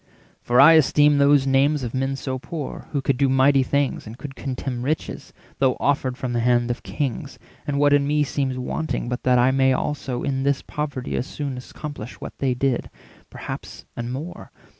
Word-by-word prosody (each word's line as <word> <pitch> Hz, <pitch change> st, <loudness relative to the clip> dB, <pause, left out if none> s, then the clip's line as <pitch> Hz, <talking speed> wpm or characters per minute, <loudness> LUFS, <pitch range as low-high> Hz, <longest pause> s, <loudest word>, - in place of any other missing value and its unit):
For 120 Hz, +1 st, +2 dB
I 145 Hz, +4 st, +9 dB
esteem 150 Hz, -1 st, +5 dB
those 140 Hz, -1 st, +5 dB
names 135 Hz, +2 st, +2 dB
of 120 Hz, -, -4 dB
men 135 Hz, +1 st, -1 dB
so 130 Hz, -1 st, -4 dB
poor, 150 Hz, +1 st, -6 dB
Who 140 Hz, -, -1 dB
could 135 Hz, -1 st, +1 dB
do 135 Hz, 0 st, +2 dB
mighty 135 Hz, +1 st, +4 dB
things, 140 Hz, -2 st, -1 dB
and 110 Hz, +2 st, -9 dB
could 145 Hz, 0 st, -8 dB
contemn 130 Hz, -1 st, -4 dB
Riches, 150 Hz, +5 st, -3 dB, 0.3 s
though 130 Hz, -2 st, +2 dB
offered 135 Hz, -3 st, 0 dB
from 125 Hz, -2 st, -3 dB
the 120 Hz, -, +1 dB
hand 120 Hz, 0 st, +2 dB
of 120 Hz, -, -4 dB
kings. 115 Hz, +5 st, -4 dB, 0.3 s
And 145 Hz, -1 st, -1 dB
what 145 Hz, 0 st, +4 dB
in 140 Hz, -1 st, +3 dB
me 150 Hz, 0 st, +2 dB
seems 135 Hz, -2 st, -2 dB
wanting 125 Hz, 0 st, -3 dB
but 125 Hz, 0 st, -3 dB
that 125 Hz, -1 st, +3 dB
I 125 Hz, +2 st, +4 dB
450 135 Hz, -, -1 dB
May 130 Hz, 0 st, +4 dB
also 130 Hz, -2 st, -2 dB
in 135 Hz, -1 st, -1 dB
this 140 Hz, 0 st, 0 dB
poverty 140 Hz, -4 st, -4 dB
as 125 Hz, -, -2 dB
soon 140 Hz, -3 st, -4 dB
Accomplish 125 Hz, -1 st, -8 dB
what -, -, -8 dB
they 130 Hz, -2 st, +1 dB
did, 130 Hz, -1 st, 0 dB, 0.4 s
perhaps -, -, -8 dB
and 120 Hz, 0 st, -4 dB
more? 150 Hz, +7 st, -7 dB
135 Hz, 200 wpm, -23 LUFS, 125-145 Hz, 0.4 s, I